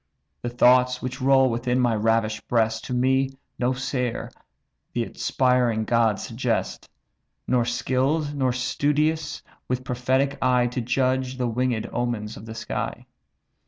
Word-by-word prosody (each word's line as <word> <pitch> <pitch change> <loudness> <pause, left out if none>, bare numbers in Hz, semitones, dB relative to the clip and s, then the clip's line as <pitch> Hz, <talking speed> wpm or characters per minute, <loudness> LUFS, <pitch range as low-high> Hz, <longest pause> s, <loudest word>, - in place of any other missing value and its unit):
The 120 - -3
thoughts 125 +1 +4
which 130 0 -4
roll 135 0 +5
within 125 +2 0
my 120 -3 +2
ravish'd 110 0 0
breast, 110 -2 +1
To 125 - -4
me, 130 +2 +2 0.3
no 125 +1 +2
seer, 125 -2 -3 0.6
the 120 - 0
inspiring 125 -2 +1
gods 115 -3 +2
suggest; 115 -1 -2 0.6
Nor 125 -2 +2
skill'd 135 +5 0
nor 130 -3 +1
studious, 150 +5 0 0.2
with 125 0 -2
prophetic 130 +2 0
eye 125 -1 +3
To 125 +1 -2
judge 130 +1 0
the 125 -1 0
winged 120 -1 -1
omens 115 -3 -2
of 110 - -11
the 110 - -7
sky. 115 0 -4
125 Hz, 135 wpm, -24 LUFS, 115-130 Hz, 0.6 s, roll